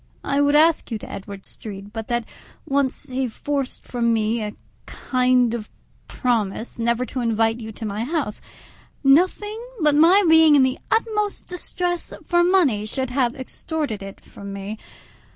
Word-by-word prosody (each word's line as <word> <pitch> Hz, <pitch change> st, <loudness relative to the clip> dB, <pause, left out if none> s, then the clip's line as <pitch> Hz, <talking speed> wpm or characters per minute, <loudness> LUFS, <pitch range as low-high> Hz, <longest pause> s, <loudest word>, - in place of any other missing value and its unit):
I 280 Hz, 0 st, +1 dB
would 285 Hz, 0 st, +3 dB
ask 320 Hz, +2 st, +4 dB
you 225 Hz, -, -2 dB
to -, -, -10 dB
Edward 195 Hz, 0 st, -8 dB
Street, 205 Hz, -1 st, -8 dB
but 225 Hz, -1 st, -5 dB
that 240 Hz, -2 st, -1 dB, 0.4 s
once 275 Hz, 0 st, +1 dB
he 260 Hz, 0 st, 0 dB
forced 275 Hz, +3 st, -3 dB
from 235 Hz, -2 st, 0 dB
me 225 Hz, +1 st, +1 dB
a 210 Hz, -1 st, -4 dB, 0.3 s
kind 250 Hz, -2 st, +1 dB
of 220 Hz, -3 st, -5 dB, 0.4 s
promise 230 Hz, -2 st, -2 dB
never 235 Hz, +2 st, +1 dB
to 255 Hz, -, -5 dB
invite 225 Hz, -1 st, +1 dB
you 220 Hz, -1 st, -7 dB
to 220 Hz, -, -7 dB
my 210 Hz, +1 st, -3 dB
house; 285 Hz, -5 st, -2 dB, 0.6 s
nothing 370 Hz, +10 st, +3 dB, 0.2 s
but 300 Hz, -3 st, +3 dB
my 340 Hz, +7 st, +6 dB
being 320 Hz, -2 st, +7 dB
in 275 Hz, -, +6 dB
the 260 Hz, 0 st, 0 dB
utmost 425 Hz, -2 st, 0 dB
distress 355 Hz, -1 st, -3 dB
for 345 Hz, -1 st, +3 dB
money 345 Hz, -, +3 dB
should 260 Hz, +2 st, -3 dB
have 250 Hz, -2 st, +1 dB
extorted 265 Hz, -3 st, -4 dB
it 195 Hz, 0 st, -9 dB
from 200 Hz, 0 st, -10 dB
me. 200 Hz, +2 st, -6 dB
255 Hz, 160 wpm, -22 LUFS, 220-305 Hz, 0.6 s, being